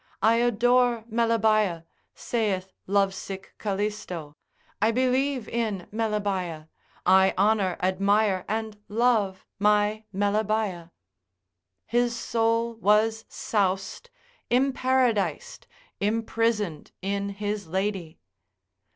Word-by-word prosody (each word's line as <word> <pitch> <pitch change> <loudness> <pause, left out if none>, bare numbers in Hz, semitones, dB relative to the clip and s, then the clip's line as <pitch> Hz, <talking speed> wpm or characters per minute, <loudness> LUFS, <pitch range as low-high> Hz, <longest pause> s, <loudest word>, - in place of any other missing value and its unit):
I 225 +1 +5
adore 240 0 +3
Melebaea, 215 -6 +2 0.3
saith 195 -5 -2
lovesick 195 -1 -1
Calisto, 200 -7 -3 0.5
I 220 - +4
believe 255 +1 +1
in 220 -6 -2
Melebaea, 200 -8 -2 0.4
I 190 +1 +5
honour, 200 -2 +2
admire 195 +1 +2
and 220 -1 -3
love 215 -4 +1
my 210 +1 +2
Melebaea; 205 -3 -1 1.0
His 240 0 +1
soul 230 0 0
was 220 +1 +2
soused, 195 - -2 0.4
imparadised, 260 - +1 0.3
imprisoned 215 -5 -1
in 200 +1 -1
his 205 -1 -4
lady. 190 -2 -2
210 Hz, 80 wpm, -26 LUFS, 195-230 Hz, 1.0 s, I